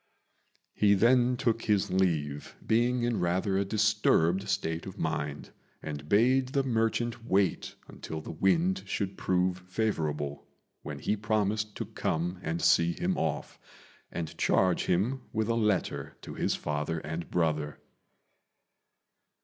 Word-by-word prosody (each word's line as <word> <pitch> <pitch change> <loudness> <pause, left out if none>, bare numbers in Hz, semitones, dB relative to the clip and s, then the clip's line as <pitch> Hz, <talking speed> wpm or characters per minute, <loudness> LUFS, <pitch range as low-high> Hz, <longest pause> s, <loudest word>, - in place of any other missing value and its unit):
He 100 -1 +4
then 125 +4 +4
took 115 -3 0
his 105 -3 +2
leave, 80 -6 0
being 120 +2 +2
in 120 -1 0
rather 95 +3 0
a 100 - +2
disturbed 100 -3 +2
state 85 -4 -1
of 95 - -8
mind, 75 -2 -3 0.3
and 75 0 -7
bade 125 +5 +4
the 135 +1 0
merchant 115 -1 0
wait 100 -5 0
until 80 - -7
the 80 - -7
wind 170 - +2
should 100 -2 -2
prove 90 -1 0
favourable, 75 -8 -2 0.3
when - - -6
he 105 - 0
promised 105 0 -1
to - - -4
come 90 +3 -2
and 85 -1 -3
see 85 0 +4
him 180 +1 -1
off, 75 - -3 0.5
and 85 -2 -5
charge 95 -2 +2
him 115 +10 +1
with 110 0 -1
a - - +3
letter 105 -5 -1
to - - -7
his - - 0
father 75 +2 -2
and 80 +2 -5
brother. 75 -4 0
95 Hz, 135 wpm, -29 LUFS, 80-115 Hz, 0.5 s, He